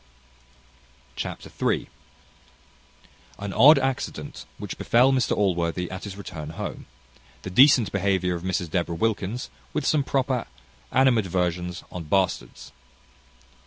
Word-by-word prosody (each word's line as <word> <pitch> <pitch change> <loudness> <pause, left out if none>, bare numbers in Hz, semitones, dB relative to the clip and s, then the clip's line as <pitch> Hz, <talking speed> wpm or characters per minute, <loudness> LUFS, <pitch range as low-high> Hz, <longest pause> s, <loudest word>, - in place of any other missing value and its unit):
Chapter - - -6
iii. - - +1 1.5
An 100 -1 -5
odd 145 +6 +8
accident 135 -1 -3
which - - -7
befel 125 +3 +4
Mr 130 -2 +1
Allworthy 90 -3 0
at 95 +2 -6
his 100 -2 -7
return 80 -6 -7
home. - - -6 0.6
The 95 - -6
decent 125 +1 +6
behaviour 95 -2 +1
of 85 - -4
Mrs 90 -3 -2
Deborah 85 -1 -1
Wilkins, 110 +4 -2 0.2
with 150 - -1
some 150 -2 +2
proper 130 -3 -1 0.4
animadversions 90 -8 +1
on 90 -2 -6
bastards. 90 -8 -1
95 Hz, 115 wpm, -25 LUFS, 90-125 Hz, 1.5 s, odd